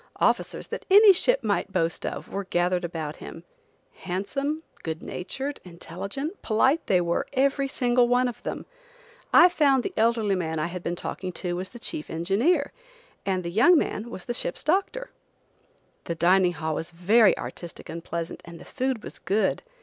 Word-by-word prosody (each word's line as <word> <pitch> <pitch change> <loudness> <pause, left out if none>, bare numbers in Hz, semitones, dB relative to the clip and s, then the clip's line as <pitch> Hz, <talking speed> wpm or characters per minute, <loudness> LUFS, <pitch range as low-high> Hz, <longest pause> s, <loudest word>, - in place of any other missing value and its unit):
Officers, - - +1
that - - -6
any 405 +1 +9
ship - - +2
might 205 -2 -1
boast 165 -3 -1
of, - - -5
were 200 0 -4
gathered 180 0 0
about 160 -3 -4
him. - - -10 0.5
Handsome, 275 - -3 0.2
good 160 0 -5
natured, 270 +10 -5
intelligent, 195 - -6
polite, 265 +8 +2
they 185 - +4
were, 170 -1 -1
every 275 +1 +2
single 245 -2 +2
one 250 +1 +3
of 245 - -6
them. - - -5 0.7
I 350 - +8
found 280 -7 +3
the - - -4
elderly 225 -2 +2
man 160 -4 -2
I 155 - 0
had 175 +1 -5
been 175 0 -3
talking 185 +1 -5
to 175 -1 -3
was 185 +1 -4
the 240 - -11
chief 155 -9 -4
engineer, 230 - +1 0.6
and 185 -2 0
the 170 - -4
young 255 - +6
man 230 -5 -2
was 190 - -8
the 240 - -2
ship's - - -3
doctor. 395 +9 0 0.9
The 170 - -3
dining 180 +1 +4
hall 160 0 -3
was 165 - -4
very 195 +5 +4
artistic 175 -1 -8
and 165 +1 -7
pleasant, 170 -1 -5
and 170 -1 -11
the - - -12
food 260 -4 -2
was - - -7
good. 210 +3 0
200 Hz, 175 wpm, -26 LUFS, 175-270 Hz, 0.9 s, any